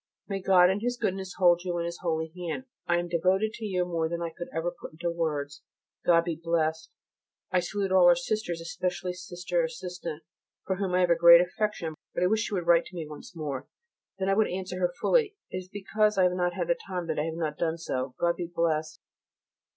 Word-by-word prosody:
May 195 -1 -3
God 185 -1 +6
in 195 - -1
His 245 +2 -1
goodness 190 -4 -2
hold 175 -2 +5
you 175 -2 -2
in 170 - -1
His 170 0 -5
holy 160 -2 -1
hand. 175 +6 -4 0.2
I 175 - +3
am 175 0 -1
devoted 185 +5 +1
to 225 - -6
you 180 -3 0
more 165 -2 -1
than 170 0 -3
I 170 -1 -3
could 175 - -6
ever 165 +2 -1
put - - -8
into 170 +2 -2
words. 150 -4 -2 0.5
God 170 -1 +6
be 170 -1 -2
Blessed! 160 -1 -1 0.6
I 185 - +4
salute 195 +2 -2
all 185 -2 +6
our 175 - +8
sisters, 175 -1 -2
especially 180 +1 -3
Sister 175 -1 -2
Assistant, 165 -1 -5 0.4
for 190 - -1
whom 190 -2 -1
I 185 - +4
have 175 -1 +3
a - - +6
great 170 0 +9
affection, 180 -3 -2 0.2
but 175 - +1
I - - +5
wish 220 +3 +1
she - - -6
would 175 -3 -2
write 170 0 +5
to 185 - -12
me 165 -3 -4
once 150 +4 -11
more, 145 -4 -4 0.5
then 190 0 -1
I 195 - +3
would 215 +1 +3
answer 185 0 -4
her 180 -1 +1
fully. 445 -5 +2 0.2
It - - -3
is 185 0 -7
because 210 +1 +1
I 190 - +5
have 180 - +4
not 180 -1 0
had - - +1
time 180 -2 -3
that 160 -2 -2
I 150 - 0
have 160 0 -3
not 155 -3 -3
done 165 -1 0
so. 130 -5 -3
God 170 0 +2
be 175 - -3
Blessed! 160 -2 -1
175 Hz, 230 wpm, -28 LUFS, 165-185 Hz, 0.6 s, great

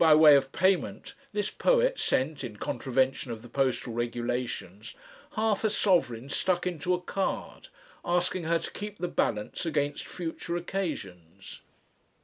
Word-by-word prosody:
By 160 -2 +8
way 155 -1 +9
of 135 -1 +2
payment, 175 - +1 0.2
this 205 -1 -1
poet - - +2
sent, 140 +2 0
in 110 -4 -6
contravention 130 +2 0
of 110 -1 -6
the - - -10
postal 130 -2 0
regulations, 120 -4 -3 0.4
half 215 -1 +1
a 220 - +3
sovereign 135 - +2
stuck 180 +5 0
into 180 0 0
a - - -4
card, 195 +2 -3 0.4
asking 180 0 0
her 165 +1 +3
to 165 - -5
keep 210 0 -6
the 175 - -2
balance 105 -8 -1
against 145 -3 -1
future 170 0 -4
occasions. 110 - -5
155 Hz, 140 wpm, -29 LUFS, 120-180 Hz, 0.4 s, way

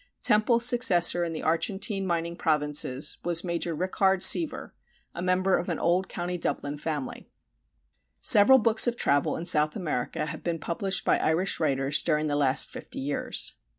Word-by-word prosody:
Temple's 230 +2 +3
successor 180 -8 +3
in 170 - -4
the 160 - -7
Argentine 195 +4 -2
mining 170 -1 -3
provinces 150 -4 0
was 170 -1 0
Major 170 -2 -3
Rickard 190 +2 0
Seaver, 320 - +3 0.4
a - - -7
member 185 +1 0
of 180 - -6
an 165 - -3
old 180 +3 -1
Co. 180 +1 -5
Dublin 145 -3 -4
family. 150 -3 -6 0.9
Several 215 +6 +6
books 230 -1 +5
of 240 0 -2
travel 145 -8 0
in 165 - -7
South 150 -3 +2
America 150 -8 -4
have - - -8
been 170 -1 -3
published 190 +5 -2
by - - +1
Irish 175 +4 -1
writers 135 -2 0
during 155 -2 -1
the 145 -1 -2
last 140 -1 +2
fifty - - -10
years. 140 +2 -1
170 Hz, 160 wpm, -26 LUFS, 150-190 Hz, 0.9 s, Several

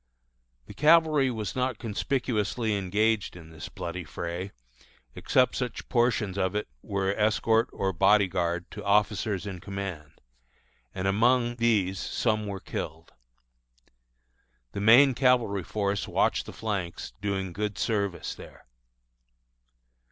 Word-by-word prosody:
The - - -11
cavalry 155 0 +4
was 110 -4 -4
not 130 -2 -1
conspicuously 115 -1 -1
engaged 105 +2 0
in 80 -2 -12
this 80 -1 -8
bloody 85 +1 -5
fray, 85 +4 -5 0.6
except 130 - +2
such 125 -3 -4
portions 115 -5 +1
of 95 +1 0
it 105 - -2 0.2
as - - -19
were 100 -1 0
escort 110 +2 +2
or 95 -1 -2
body 100 +4 +4
guard 85 -1 -2
to 105 - -8
officers 105 -1 +1
in 95 -3 -6
command, 95 -6 -7 0.8
and 95 +1 -2
among 120 +4 +2
these 105 -6 +1
some 110 -2 -1
were 100 -1 -4
killed. 80 -2 -6 1.6
The 100 - -4
main 125 +6 +7
cavalry 120 -7 +2
force 100 +1 -2
watched - - +1
the - - -6
flanks, 100 -6 -4
doing 95 -3 -2
good 105 +1 -3
service 100 -3 -1
there. - - -14
105 Hz, 125 wpm, -27 LUFS, 95-115 Hz, 1.6 s, main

